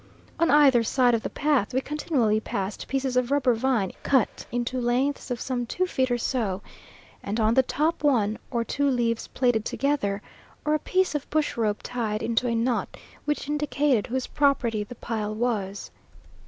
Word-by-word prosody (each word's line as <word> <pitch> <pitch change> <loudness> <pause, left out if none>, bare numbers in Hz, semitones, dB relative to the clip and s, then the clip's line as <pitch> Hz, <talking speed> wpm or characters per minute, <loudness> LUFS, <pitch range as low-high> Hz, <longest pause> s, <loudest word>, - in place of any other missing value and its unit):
On 335 - +3
either 280 -5 +6
side 245 +1 +3
of 230 - +1
the - - -4
path 275 -6 0
we - - +4
continually 265 -7 0
passed 200 -2 -4
pieces 270 -1 -1
of 250 -1 +2
rubber 275 -3 +3
vine 230 -5 0
cut 260 -6 +1
into 245 +2 -2
lengths 255 +4 0
of 245 -1 -2
some 245 -2 -2
two 370 +9 0
feet 260 -7 0
or 245 - +1
so, 220 -6 -1 0.6
and 205 +3 -3
on 220 0 +3
the 265 - +6
top 305 +5 -1
one 220 -7 +2
or 235 -3 0
two 280 +5 0
leaves 235 -3 0
plaited 245 -4 +1
together, 215 -8 -1 0.4
or 300 - +2
a 305 - +2
piece 370 +3 +1
of 295 -2 -3
bush 310 -1 0
rope 215 -3 0
tied 220 -4 -2
into 235 +2 +1
a 230 - 0
knot, 235 +1 -1 0.3
which 295 -2 -1
indicated 295 -5 +1
whose 260 +1 -2
property 250 -7 +1
the 225 +4 -10
pile 215 -2 -3
was. 210 -4 -2
245 Hz, 180 wpm, -26 LUFS, 225-280 Hz, 0.6 s, either